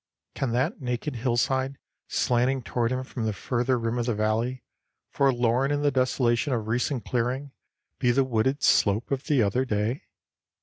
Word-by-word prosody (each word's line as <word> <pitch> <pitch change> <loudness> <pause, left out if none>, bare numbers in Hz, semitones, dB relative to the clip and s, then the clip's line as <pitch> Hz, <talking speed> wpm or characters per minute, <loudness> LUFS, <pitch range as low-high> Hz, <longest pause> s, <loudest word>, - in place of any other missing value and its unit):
Can 135 -3 -2
that 140 - 0
naked 125 +2 -3
hillside 130 +3 0 0.3
slanting 125 +2 +1
toward 120 +1 -1
him 130 0 -1
from 125 -3 -5
the 110 - 0
further 125 +4 0
rim 115 +1 -1
of 120 - -1
the 120 - +1
valley, 115 +4 -1 0.5
forlorn 125 -1 +2
in 145 0 0
the 145 - +3
desolation 130 0 +1
of 110 -3 -2
recent 125 +2 -1
clearing, 130 +3 -1 0.5
be 125 - +2
the 130 +3 +4
wooded 130 +3 0
slope 105 +5 +3
of 135 0 -1
the 140 -6 +3
other 105 +6 +1
day? 110 +1 -2
125 Hz, 165 wpm, -26 LUFS, 115-130 Hz, 0.5 s, the